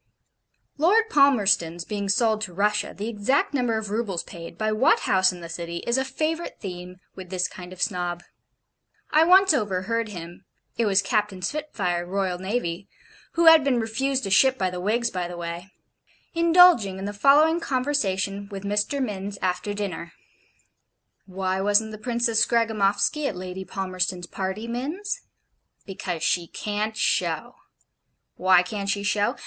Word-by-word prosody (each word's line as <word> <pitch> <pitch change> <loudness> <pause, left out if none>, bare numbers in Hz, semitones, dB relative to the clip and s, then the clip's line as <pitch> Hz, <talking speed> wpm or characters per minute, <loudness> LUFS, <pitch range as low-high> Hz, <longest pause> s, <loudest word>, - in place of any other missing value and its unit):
Lord 435 +8 +3
Palmerston's 200 - +3
being 200 -2 -4
sold 220 +1 +2
to 190 -5 -4
Russia, 210 +1 0
the 205 +2 -4
exact 235 +7 0
number 245 -5 0
of 215 -2 -5
roubles 210 -5 -2
paid, 170 0 -10
by 215 +2 0
what 215 - +3
house 190 -1 +3
in 180 -1 -10
the 170 - -7
City, 170 +1 -5
is 235 - +1
a 265 - +1
favourite 310 +5 -3
theme 180 -2 -7 0.2
with 185 -2 -10
this 180 -1 -1
kind 180 -1 -11
of 185 -1 -10
Snob. 175 -3 -2 0.9
I 310 +1 +5
once 375 +1 +6
overheard 220 -1 -1
him 175 -3 -9 0.3
it 230 - 0
was 195 0 +3
Captain 210 -5 -1
Spitfire, 185 - -2
R.N., 190 0 -2 0.5
(who 335 0 +2
had 325 -2 +8
been 265 -3 +1
refused 260 +4 -1
a 195 - -4
ship 260 +6 +5
by 185 -1 -1
the 180 - -5
Whigs, 230 +5 0
by 180 -2 -3
the 175 0 -8
way) 170 +2 -6 0.6
indulging 335 - +5
in 195 - -5
the 205 - -4
following 295 +9 +4
conversation 200 - -1
with 195 -2 -7
Mr. 210 +7 0
Minns 200 -3 -5
after 185 +2 -2
dinner. 185 -5 -5 1.1
Why 190 0 -2
wasn't 205 +2 +2
the 215 - -9
Princess 235 -1 +1
Scragamoffsky 225 +5 +1
at 200 - -4
Lady 185 +1 -6
Palmerston's 185 -2 -3
party, 190 +5 -4
Minns? 330 - -4 0.6
Because 180 -4 -5
SHE 175 -2 +1
CAN'T 215 +3 -3
SHOW - - 0 0.8
why 185 -1 +4
can't 200 +1 -5
she 200 0 -1
show? 205 0 +1
205 Hz, 155 wpm, -24 LUFS, 185-240 Hz, 1.1 s, had